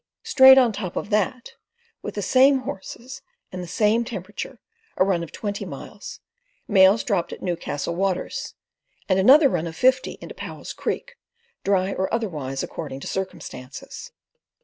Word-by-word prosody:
Straight 265 -1 +8
on 250 -3 +5
top 195 -3 -5
of 205 - -4
that, 215 +4 -1 0.5
with - - -6
the 205 - -2
same 265 +6 +5
horses 235 +4 -8 0.3
and 180 - -5
the 175 - -7
same 215 +5 +2
temperature, 205 -3 -7 0.4
a 185 - +4
run 190 -3 +1
of 170 - -7
twenty 205 -2 -4
miles, - - -9 0.5
mails 195 +1 +5
dropped 195 -7 -1
at - - -8
Newcastle 170 -3 -3
Waters, 190 0 -2 0.5
and 190 -1 +2
another 275 +9 +7
run 175 -9 -1
of 160 - -7
fifty 255 +6 +2
into - - -9
Powell's - - -8
Creek, - - -4 0.5
dry 195 -1 +1
or 190 - -2
otherwise 150 - -2
according 140 -4 -6
to - - -7
circumstances. 185 -8 -7
195 Hz, 150 wpm, -23 LUFS, 180-235 Hz, 0.5 s, Straight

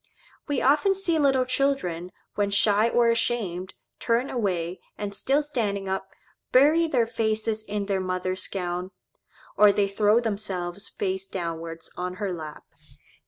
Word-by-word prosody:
We 285 -3 0
often 300 +8 +4
see 345 -4 +1
little 270 -3 +3
children, 250 -11 0 0.2
when 205 -1 0
shy 205 +2 +3
or 235 0 +3
ashamed, 195 -6 -1 0.2
turn 235 +3 0
away, 185 -7 -1 0.2
and 205 -1 -4
still 275 +8 +1
standing 210 -9 -2
up, 190 0 -3 0.4
bury 305 +6 +5
their 250 -7 +2
faces 220 -1 -1
in 205 -1 -3
their 195 -1 0
mother's 185 0 -2
gown; 180 -1 -3 0.7
or 210 -1 +7
they 200 0 +1
throw 210 +3 +3
themselves 200 -4 -3
face 190 0 -2
downwards 165 -2 -5
on 180 0 -3
her 200 -2 -3
lap. 155 -3 -8
205 Hz, 140 wpm, -26 LUFS, 185-240 Hz, 0.7 s, or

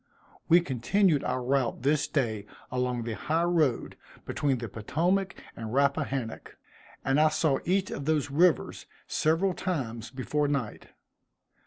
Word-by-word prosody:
We 175 +2 +7
continued 155 - +2
our 125 0 -1
route 130 -2 0
this 145 +1 +2
day 110 -7 -1 0.2
along 125 -1 -1
the 115 0 -3
high 160 +9 0
road 160 -8 +1 0.3
between 145 -3 0
the 120 -1 -5
Potomac 175 - 0 0.2
and 110 -1 -6
Rappahannock; 140 -4 -1 0.5
and 135 +2 +3
I 155 - +5
saw 155 -3 +1
each 190 +2 +1
of 140 - -5
those 150 -2 +1
rivers 170 +4 +2 0.2
several 165 +5 +1
times 120 - -3
before 140 +4 -1
night. 140 -7 -3
140 Hz, 135 wpm, -28 LUFS, 125-160 Hz, 0.5 s, We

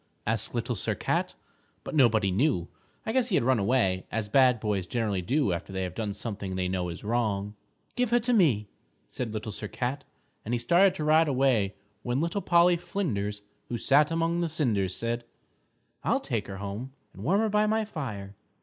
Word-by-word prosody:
asked 110 +2 -1
Little 120 +1 -1
Sir 105 - -1
Cat. - - -1 0.5
But - - -6
nobody 110 -9 +4
knew. 95 - +1 0.4
I 220 - -1
guess 255 0 +1
he 195 - +1
had - - +3
run 130 -1 +3
away, 100 -4 +1
as 110 -1 -2
bad 125 0 +5
boys 105 -4 -1
generally 105 -5 -1
do 125 - +1
after 85 +3 -5
they 95 0 -2
have 90 -1 -4
done 105 -1 -3
something 100 -3 -5
they 90 0 -1
know 90 -1 -2
is 85 - -7
wrong. 105 -3 -1 0.4
"Give 250 -2 +1
her 240 - +4
to 245 +2 +1
me," 135 - +3 0.4
said 120 -3 -4
Little 110 0 -4
Sir 105 +1 -5
Cat, 130 +6 -3 0.4
and 120 +3 -1
he - - +1
started 175 +11 +4
to 155 - -3
ride 155 +1 +4
away 125 -8 +2 0.3
when 120 +3 -1
Little 170 +6 -1
Polly 175 0 +4
Flinders 105 - -3 0.3
who 120 - -2
sat 145 +5 +4
among 165 +1 0
the 170 -1 0
cinders 105 - 0
said, 120 +1 -2 0.8
"I'll - - +2
take - - -3
her 95 - -6
home 100 +7 -6 0.2
and - - -10
warm 195 +5 +3
her 220 - +1
by 210 +1 +2
my 220 0 +1
fire!" 115 - -6
120 Hz, 195 wpm, -28 LUFS, 100-155 Hz, 0.8 s, bad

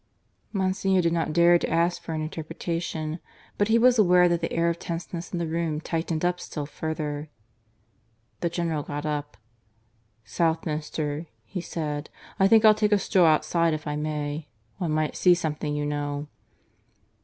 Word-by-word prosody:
Monsignor 190 -1 +1
did 170 -1 +1
not 165 -2 0
dare 170 +2 +5
to - - -2
ask 170 +2 +1
for 165 - -5
an 155 - -2
interpretation. 160 0 -4 0.4
But 205 - +3
he 225 +1 +4
was 245 0 +5
aware 180 -3 +6
that 170 0 +1
the 165 - -2
air 165 0 +1
of 170 0 0
tenseness 170 0 -5
in 180 - -2
the 170 - -1
room 160 -1 -1
tightened 165 0 -2
up 180 0 +1
still 150 -4 -5
further. 150 0 -4 1.1
The 170 - 0
General 165 -3 -1
got 145 +1 -5
up. 145 -5 -3 0.9
"Southminster," 155 0 -1 0.2
he 180 - -5
said, 150 -3 -4 0.3
"I 195 - +6
think 220 +2 +6
I'll 215 - +9
take 210 0 +1
a 210 - +6
stroll 185 -3 +3
outside 160 +1 +2
if 155 - -7
I 150 -1 -2
may. 150 0 -3 0.3
One 175 -4 -1
might 155 0 0
see 180 -1 +5
something, 150 -3 -2
you 150 0 -1
know." 145 0 -2
165 Hz, 165 wpm, -26 LUFS, 150-175 Hz, 1.1 s, I'll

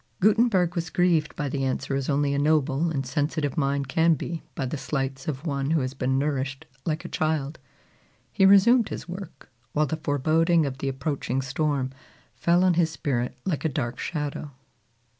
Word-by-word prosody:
Gutenberg 205 -4 +3
was 170 -2 -3
grieved 175 -3 +2
by 145 - -2
the 135 0 -2
answer 135 +1 -1
as 135 +1 -1
only 140 0 +1
a 140 - 0
noble 150 +1 +2
and 140 -4 -2
sensitive 145 +1 -1
mind 140 -2 0
can 165 +4 +3
be 165 +3 -5
by 135 - -2
the 130 - -3
slights 135 -1 -3
of 145 0 -3
one 140 -3 -1
who 160 -1 +2
has 130 0 -3
been 130 0 0
nourished 140 0 -2 0.2
like 155 -1 -1
a - - -3
child. 155 -1 -1 0.7
He 195 -2 +4
resumed 220 +4 +6
his - - -6
work, 185 +2 -9 0.2
while 150 +1 +2
the 155 +2 -3
foreboding 160 +3 +2
of 135 -1 -4
the 140 - -1
approaching 135 -1 -2
storm 135 0 -1 0.4
fell 175 +1 +2
on 185 -1 +4
his 165 -1 +2
spirit 125 -6 -2
like 175 -6 -1
a 160 - +2
dark 125 -4 -3
shadow. 150 -2 -3
150 Hz, 180 wpm, -26 LUFS, 135-165 Hz, 0.7 s, resumed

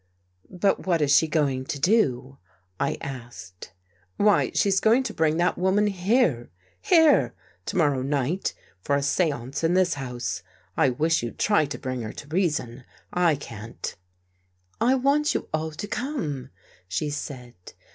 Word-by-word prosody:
" 90 0 -43
But 190 +1 0
what 170 -3 +2
is 145 -1 +4
she 160 - +5
going 140 -5 0
to 140 - -4
do? 135 - +1 0.2
" 90 0 -42
I - - 0
asked. 120 -9 -9 0.2
" 90 0 -36
Why, 205 0 +3
she's 195 -1 +3
going 230 +6 +4
to - - -4
bring 160 0 +1
that 175 +1 +1
woman 190 +3 +2
here 190 - +1 0.2
— 95 - -37
here 320 -4 +4
I - - -38
— - - -37
To 200 - -2
morrow 145 -6 +2
night, 145 +6 -1 0.3
for 140 - 0
a 140 - 0
seance 140 -3 -1
in 165 +2 +2
this 185 -2 +3
house. 120 -10 -4 0.3
I 135 - +3
wish 160 +6 +1
you'd 120 -1 -6
try 205 -8 +2
to 145 - -5
bring 130 -2 -4
her 110 -1 -6
to 145 - -10
reason. 150 -8 -1 0.3
I 175 -4 +3
can't." 115 -4 -7 0.4
" 90 - -41
I 250 +3 +4
want 280 +3 +2
you - - -3
all 160 0 -1
to 160 +6 -7
come," 210 - -3 0.4
she 120 +12 -2
said. 130 -4 -6
150 Hz, 175 wpm, -25 LUFS, 125-185 Hz, 0.4 s, she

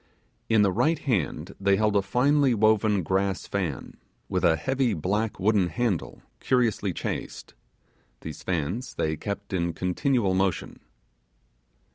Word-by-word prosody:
In 110 -2 +5
the 100 - +3
right 155 - +2
hand 95 - -2
they 100 0 +3
held 105 0 +1
a 100 - +4
finely 130 +6 +2
woven 110 -2 +3
grass 95 +2 0
fan, 90 -9 -4 0.3
with 90 -1 -1
a 85 -2 +5
heavy 130 - 0
black 105 +7 -1
wooden 100 -1 +3
handle 95 +1 -2 0.2
curiously 115 -6 +1
chased: - - -5 0.7
these 80 -2 -8
fans 90 - -3
they 80 0 -1
kept 100 +3 -6
in 85 -2 0
continual 100 - 0
motion. 95 -2 -1
100 Hz, 130 wpm, -26 LUFS, 90-115 Hz, 0.7 s, In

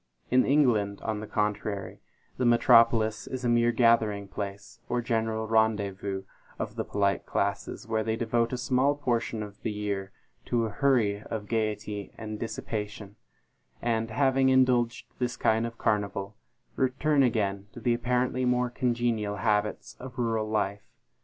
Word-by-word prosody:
In 130 +1 +5
England, 115 -8 +3
on 110 -1 -2
the 110 - -7
contrary, 105 -1 -2 0.4
the - - -1
metropolis 115 -2 +4
is 130 -1 -4
a - - +2
mere 120 0 +4
gathering 115 -4 +3
place, 100 +2 -7
or 120 - +1
general 110 -2 -1
rendezvous, 100 -3 0 0.3
of - - -4
the - - -2
polite 100 -1 0
classes, 100 +2 -2
where 110 -1 0
they 110 0 -1
devote 115 0 0
a 125 - -2
small 130 +3 +2
portion 120 -5 -1
of 105 -1 -11
the - - -2
year 100 -2 -3 0.3
to 115 -1 +1
a 110 - -4
hurry 110 -5 +2
of 110 -1 -5
gayety 105 -2 -2
and 110 -1 -6
dissipation, 105 -3 -5 0.6
and, 115 -1 0
having 130 +2 +3
indulged 125 -2 +3
this 125 -1 -1
kind 110 +1 +2
of 115 0 -10
carnival, 100 -1 -1 0.4
return 140 +3 +2
again 100 -5 0
to - - -9
the 120 +1 +1
apparently 125 +1 0
more 125 0 +1
congenial 120 -5 0
habits 105 +2 -1
of 130 +1 -9
rural 115 -3 0
life. 100 -2 -2
110 Hz, 150 wpm, -28 LUFS, 105-120 Hz, 0.6 s, In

